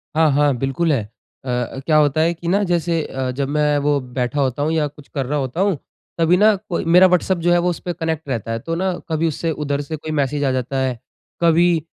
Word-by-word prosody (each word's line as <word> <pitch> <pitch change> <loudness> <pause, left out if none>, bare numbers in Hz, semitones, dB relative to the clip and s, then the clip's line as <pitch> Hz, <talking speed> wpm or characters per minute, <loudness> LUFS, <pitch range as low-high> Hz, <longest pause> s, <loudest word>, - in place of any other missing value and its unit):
हाँ, 160 -1 +4
हाँ, 145 -1 +3
बिल्कुल 135 +6 0
है। 135 -6 +1 0.4
अ, 125 +1 -2
क्या 155 -2 +3
होता 150 0 +3
है 165 +2 +2
कि 170 0 -8
न 200 +4 +2
जैसे 170 -2 0
अ, 130 -1 -3
जब 135 +1 -2
मैं 150 0 +2
वो 145 0 +1
बैठा 125 +2 -3
होता 135 +1 0
हूँ 155 - 0
या 155 -2 +1
कुछ 145 0 -15
कर 135 -3 -3
रहा 145 +4 -1
होता 135 +6 -2
हूँ 195 -5 +2 0.4
तभी 170 +2 +3
न 210 +1 +5
कोई 170 - -2
मेरा 180 +3 +7
व्हाट्सएप 180 0 +1
जो 175 - +4
है 175 - +5
वो - - +3
उसपे 175 +1 -4
कनेक्ट 160 -2 -3
रहता 115 -3 -3
है 115 - -2
तो 165 +8 -4
न 190 +2 0 0.2
कभी 160 +1 +1
उससे 160 +1 -2
उधर 145 -2 -2
से 150 +2 -5
कोई 155 +1 -6
मैसेज़ 145 -1 0
आ 135 - +2
जाता 130 +1 -2
है। 130 -3 -1 0.4
कभी 170 -1 +3
150 Hz, 240 wpm, -20 LUFS, 135-170 Hz, 0.4 s, मेरा